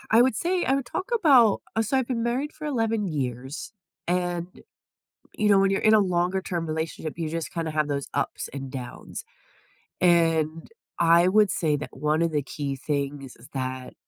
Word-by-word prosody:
I 230 +2 +7
would 250 -3 +2
say 355 - 0
I 265 - +2
would 275 -2 -2
talk 375 - -4
about 265 - +5
uh 225 - +3
so 225 +5 0
I've 260 - 0
been 240 -3 -1
married 255 +6 -1
for 305 - -7
11 225 -6 0
years, 130 - -4 0.3
and, 175 -1 -1 0.9
you 210 -1 +2
know, 200 -1 +6
when 195 0 +4
you're 195 - 0
in 215 - +5
a 215 - +7
longer 180 -1 +1
term 170 -3 -3
relationship, 160 0 -3
you 160 -2 -2
just 165 0 -4
kinda 165 -2 -2
have 150 -1 0
those 140 -1 -2
ups - - -2
and 135 -2 -6
downs, 125 -3 -7 0.8
and 165 -2 +2 0.3
I 170 +1 +5
would 205 +1 +4
say 155 -3 +1
that 150 - -6
one 150 +3 +1
of 170 -1 +1
the 150 - +1
key 140 0 -4
things 140 -1 -3 0.2
that 130 -1 -4
170 Hz, 190 wpm, -25 LUFS, 150-215 Hz, 0.9 s, I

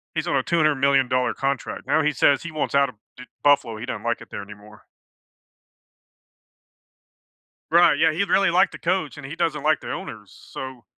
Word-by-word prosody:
he's - - -2
on - - 0
a - - +1
two-hundred-million-dollar 140 -5 +2
contract. 135 -1 -3
Now, 155 +3 +3
he 150 - +2
says 140 +1 +2
he 170 - -6
wants 155 -2 -3
out 140 -1 +3
of 125 - -14 0.2
de 125 - -10 0.2
Buffalo. 130 -6 +3
He 110 - -6
don't 130 - -6
like 120 0 -1
it - - -13
there - - -6
anymore. 105 +1 -15 2.9
Right, 170 -3 +5
yeah, 160 +2 +3
he 170 +6 0
really 195 -2 +2
liked 185 +2 +3
the - - -9
coach, 170 -5 -1
and 145 - -9
he 140 +4 -7
doesn't 165 -4 -1
like 155 +1 +2
their - - -5
owner, 110 -2 -7
so 130 +6 -10
140 Hz, 185 wpm, -23 LUFS, 125-160 Hz, 2.9 s, Right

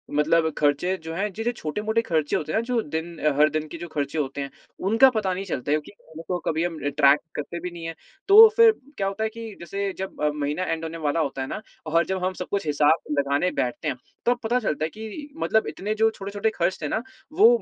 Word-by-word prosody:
मतलब 160 +2 +3
खर्चे 150 +5 +2
जो 160 0 -5
हैं, 200 +4 -1
जैसे 225 +5 -1
छोटे-मोटे 215 +3 -1
खर्चे 160 -8 0
होते 155 0 -2
हैं - - +1
ना, - - -2
जो 240 -1 0
दिन 160 +1 -5
अ, 150 - +2
हर 150 +1 +6
दिन 155 +1 -2
के 170 - -8
जो 170 +1 -7
खर्चे 145 +1 -2
होते 140 -1 -2
हैं, 140 - -4 0.4
उनका 225 +6 +7
पता 195 -4 +1
नहीं 190 +2 -4
चलता 145 -6 -3
है, 150 - +4
क्योंकि 150 - -13 0.2
उनको 165 +3 -3
कभी 160 +1 0
हम 175 -1 -3
अ, - - +2
ट्रैक 145 0 +5 0.2
करते 160 +4 -4
भी 180 +1 -5
नहीं 170 -1 -9
हैं। 165 0 -5 0.3
तो 430 +3 +11
फिर 460 -1 +8 0.3
क्या 195 - 0
होता 200 +3 -2
है 220 - +1
कि 230 0 -8
जैसे, 195 +4 -3
जब 190 0 -5 0.2
महीना 150 +4 -1
एंड 165 -2 -2
होने 165 0 -5
वाला 145 +3 +1
होता 140 -3 -1
है 130 - -3
ना, 210 - -5 0.2
और 165 +1 +2
जब 190 -1 -2
हम 185 - 0
सब - - -6
कुछ 200 -3 -1
हिसाब 150 +1 +2
लगाने 140 +5 +1
बैठते 125 +5 -2
हैं, 130 - -1 0.3
तब 245 0 +3
पता 240 +3 +2
चलता 155 -9 -1
है - - -3
कि 220 - -8
मतलब 220 -8 +1
इतने 210 +3 -3
जो 220 +1 +4
छोटे-छोटे 200 +1 -2
खर्च 175 +2 0
थे 150 - -1
ना, 220 - -1 0.3
वो 400 +7 +7
170 Hz, 245 wpm, -25 LUFS, 150-210 Hz, 0.4 s, तो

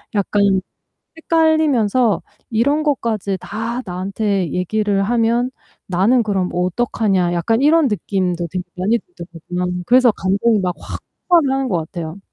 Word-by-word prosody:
약간 200 -1 +2 0.6
헷갈리면서 295 -9 +2 0.3
'이런 280 +7 +2
것까지 220 -9 -1
다 230 +4 -4
나한테 190 0 -2
얘기를 200 +2 0
하면 235 +3 +1 0.4
나는 200 +7 +3
그럼 195 -4 -1
어떡하냐.' 185 0 0
약간 225 +8 +1
이런 310 -1 +5
느낌도 180 -4 -1
되게 185 -1 -3
많이 215 +6 +1
들더라고요. 180 - -6
그래서 250 -1 +5
감정이 205 +3 +1
막 180 -2 -1
확 - - -7 0.3
폭발을 330 -7 +4
하는 270 -1 -1
것 180 - +1
같아요. 160 +1 -6
205 Hz, 300 characters per minute, -19 LUFS, 185-240 Hz, 0.6 s, 이런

